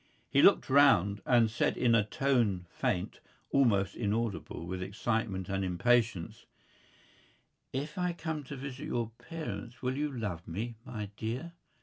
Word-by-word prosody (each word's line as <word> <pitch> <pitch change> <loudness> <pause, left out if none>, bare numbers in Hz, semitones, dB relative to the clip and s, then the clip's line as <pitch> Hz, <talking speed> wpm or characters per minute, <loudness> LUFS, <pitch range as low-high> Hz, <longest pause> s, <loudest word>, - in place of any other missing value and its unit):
He - - +5
looked - - +6
round 110 -8 +5
and 120 -3 +5
said 115 - +1
in 120 -2 +3
a 115 -2 +5
tone 110 -5 +1
faint, 90 - -2 0.3
almost 100 -8 +3
inaudible 105 -7 -2
with 90 +1 -4
excitement 100 -1 -2
and 95 0 -1
impatience: 105 0 +1 1.2
"If 145 +6 -4
I 180 -1 0
come 160 -3 -4
to 145 - -7
visit 135 0 -6
your 115 -2 -2
parents 125 -7 -7
will 130 +1 0
you 150 +1 -1
love 105 -10 -4
me, 110 +8 -4
my 105 -4 -6
dear?" 125 +10 -4
115 Hz, 140 wpm, -31 LUFS, 100-130 Hz, 1.2 s, looked